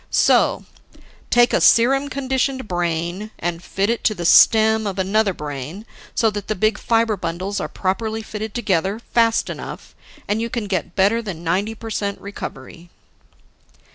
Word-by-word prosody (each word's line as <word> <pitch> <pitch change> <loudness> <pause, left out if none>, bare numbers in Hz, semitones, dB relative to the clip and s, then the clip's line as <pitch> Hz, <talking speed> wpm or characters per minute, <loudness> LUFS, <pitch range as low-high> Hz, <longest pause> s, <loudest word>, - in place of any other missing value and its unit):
So, - - +3 0.6
take 240 0 +4
a - - +3
serum 270 +4 +4
conditioned 265 -2 -1
brain 175 +3 -2
and 175 0 -4
fit 195 +1 -1
it 235 +1 -1
to 215 - +2
the 175 -2 -5
stem 220 +4 +5
of 195 -1 -4
another 200 +2 +1
brain 150 - -7 0.3
so 225 -2 +2
that 205 -1 -6
the 215 - -1
big 215 +3 +1
fiber 225 -2 +1
bundles 185 +2 -3
are - - -3
properly 220 +4 -2
fitted 215 0 -6
together, 195 -4 0
fast 230 -1 +1
enough, - - -8 0.3
and 210 +2 0
you 230 - -2
can 235 -2 -3
get 185 -3 -3
better 205 +4 +3
than 185 -7 -7
ninety 195 +7 -1
per 225 0 -8
cent 200 -2 -2
recovery." 175 -4 -9
205 Hz, 160 wpm, -21 LUFS, 180-225 Hz, 0.6 s, stem